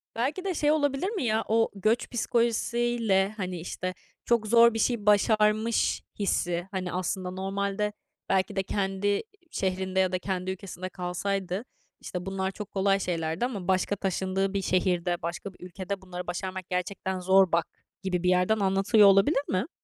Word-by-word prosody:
Belki 280 +11 -1
de 375 - 0
şey 295 -1 +2
olabilir 290 +4 +1
mi 410 - -3
ya? 220 -1 +1
O 225 +1 +3
göç 215 +4 +1
psikolojisi 235 0 0
ile, 220 -5 +2
hani, 180 -3 -3
işte, 185 +2 -4 0.3
çok 235 -2 +2
zor 235 +1 +6
bir 225 - -2
şey 235 -4 0
başarmış 215 +2 +3 0.2
hissi. 175 -3 0
Hani 185 -2 -3
aslında 185 0 -2
normalde 200 +2 -2 0.4
belki 190 +1 +1
de 195 - +1
kendi 200 +1 0 0.3
şehrinde 190 0 -1
ya 185 -1 +3
da 185 - -1
kendi 185 0 -2
ülkesinde 185 -1 -6
kalsaydı, 185 +3 -3 0.4
işte, 180 -1 -5
bunlar 190 0 -2
çok 210 0 -8
kolay 195 0 +2
şeylerdi 165 +3 -1
ama 200 -8 -5
başka 190 +2 +1
taşındığı 190 0 -1
bir 200 - 0
şehirde, 180 -2 0
başka 170 +4 -5
bir 180 - -12
ülkede 190 +2 -5
"Bunları 180 -1 -7
başarmak 185 +1 -4
gerçekten 185 +1 -2
zor, 190 0 +4
bak." 170 0 +2 0.4
gibi 180 -2 -1
bir 180 - +3
yerden 180 +4 +3
anlatılıyor 195 +2 +5
olabilir 195 +10 +5
mi? 190 - -1
195 Hz, 165 wpm, -27 LUFS, 185-215 Hz, 0.4 s, zor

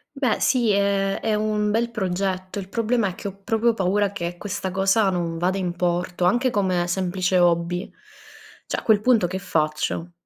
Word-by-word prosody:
Beh, 255 -6 0
sì. 245 -4 +2
Ehm, 200 -1 +1
è 220 - 0
un 210 0 0
bel 230 +2 0
progetto. 190 -2 -2
Il 190 -1 -6
problema 230 0 0
è 180 - -6
che 200 - -6
ho 195 0 -11
proprio 225 +2 +2
paura 200 0 +1
che 175 -3 -5
questa 195 -1 -4
cosa 195 +2 +2
non 170 -3 -2
vada 180 +3 0
in 180 -2 -2
porto, 175 0 -1
anche 245 +8 +3
come 185 -5 0
semplice 185 0 0
hobby. 175 +1 +1 0.8
Cioè - - -2
a - - -4
quel 215 -2 +4
punto 225 -4 +3
che 185 +2 -3
faccio? 160 0 -2
195 Hz, 180 wpm, -23 LUFS, 180-215 Hz, 0.8 s, quel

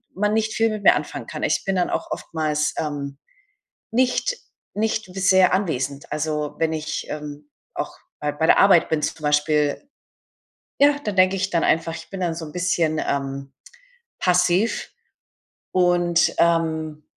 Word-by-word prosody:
man 210 +2 +1
nicht 220 0 0
viel 225 0 +2
mit 215 -2 -5
mir - - +7
anfangen - - -5
kann. - - -6
Ich - - +1
bin 195 - 0
dann 180 - +1
auch - - -3
oftmals, 150 -2 -1
ähm, 140 -2 -4 0.8
nicht 255 - +1 0.4
nicht 220 +1 -1
sehr 190 -1 +4
anwesend. 140 -7 -2
Also, 150 -1 -2
wenn 160 -1 +1
ich, 155 -1 -4
ähm, 150 -1 -7 0.2
auch - - -4 0.3
bei 150 -1 -1
bei 160 +2 0
der - - +5
Arbeit 195 -4 +5
bin 155 -1 0
zum 160 - -3
Beispiel 150 - +1 0.9
ja, 285 0 +6
dann 205 -2 -3
denke 185 +1 +4
ich 190 +1 -1
dann 170 -2 +1
einfach, 165 0 +1
ich - - -11
bin 195 -1 -6
dann 170 -2 -1
so 165 - -5
ein 150 - -11
bisschen, 170 -3 0
ähm, 135 0 -3 0.7
passiv. 180 +4 +1 0.8
Und, 175 -1 +2
ähm, 160 -2 +1
165 Hz, 155 wpm, -22 LUFS, 150-190 Hz, 0.9 s, mir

